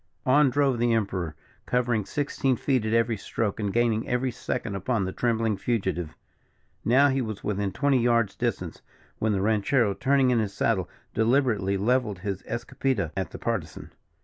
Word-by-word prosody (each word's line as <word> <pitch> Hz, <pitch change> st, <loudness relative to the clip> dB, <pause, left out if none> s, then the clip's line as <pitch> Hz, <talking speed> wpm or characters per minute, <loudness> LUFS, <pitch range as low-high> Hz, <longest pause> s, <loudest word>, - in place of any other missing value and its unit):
On 140 Hz, +2 st, +5 dB
drove 135 Hz, -2 st, +1 dB
the 120 Hz, 0 st, +2 dB
Emperor, 95 Hz, -8 st, -1 dB, 0.3 s
covering 120 Hz, -4 st, +1 dB
sixteen 135 Hz, +1 st, 0 dB
feet 125 Hz, -2 st, 0 dB
at 110 Hz, -, -1 dB
every 115 Hz, -1 st, +2 dB
stroke, 105 Hz, +1 st, -3 dB
and 105 Hz, -2 st, -1 dB
gaining 115 Hz, 0 st, +1 dB
every 125 Hz, +1 st, 0 dB
second 110 Hz, -2 st, -4 dB
upon 100 Hz, +2 st, -1 dB
the 95 Hz, -, -3 dB
trembling 115 Hz, -1 st, 0 dB
fugitive. 95 Hz, -9 st, -2 dB, 0.7 s
Now 135 Hz, +5 st, +5 dB
he 135 Hz, 0 st, +1 dB
was 110 Hz, -4 st, -5 dB
within 100 Hz, -1 st, -1 dB
twenty 135 Hz, +5 st, +2 dB
yards 115 Hz, -4 st, +2 dB
distance, 95 Hz, -8 st, -3 dB, 0.4 s
when 110 Hz, -, +1 dB
the 100 Hz, -2 st, 0 dB
ranchero, 110 Hz, +1 st, +2 dB
turning 135 Hz, +3 st, +2 dB
in 120 Hz, -, +3 dB
his 105 Hz, -3 st, -2 dB
saddle, 100 Hz, -3 st, 0 dB, 0.2 s
deliberately 110 Hz, -4 st, +2 dB
levelled 115 Hz, 0 st, +1 dB
his 95 Hz, +1 st, -4 dB
escopeta 120 Hz, -, -2 dB
at 95 Hz, -1 st, -2 dB
the -, -, -8 dB
Partisan. 100 Hz, -10 st, -4 dB
115 Hz, 165 wpm, -26 LUFS, 100-125 Hz, 0.7 s, On